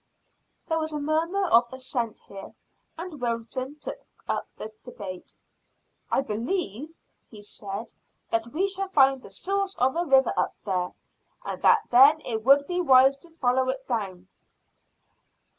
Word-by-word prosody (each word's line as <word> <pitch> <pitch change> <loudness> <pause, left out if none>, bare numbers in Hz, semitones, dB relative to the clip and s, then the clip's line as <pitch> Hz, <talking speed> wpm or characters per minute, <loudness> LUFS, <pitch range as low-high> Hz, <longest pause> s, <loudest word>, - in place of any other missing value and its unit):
There 325 -1 0
was 315 0 -3
a 300 - -2
murmur 325 +6 0
of 235 -7 +4
assent 255 -3 -4
here, 195 -1 -10 0.4
and 330 -5 -8
Wilton 240 +3 -3
took 300 - -6 0.3
up - - -2
the 215 - -7
debate. 190 -7 -9 0.7
"I - - +2
believe," 275 - -3 0.3
he 210 -2 -12
said, 205 +2 -6 0.4
"that 225 0 0
we 335 +11 0
shall 390 0 -3
find 270 -6 +4
the - - -12
source 395 0 -2
of 260 +3 +1
a 340 - +1
river 270 -4 +4
up - - 0
there, 180 -3 -1 0.5
and - - -5
that 455 - +5
then 275 +6 +7
it 220 -2 -2
would 280 +3 +6
be 360 +2 -1
wise 270 -3 +6
to 335 +5 -17
follow 260 -5 +1
it 265 0 -3
down." 195 -7 -3
265 Hz, 150 wpm, -26 LUFS, 230-320 Hz, 0.7 s, then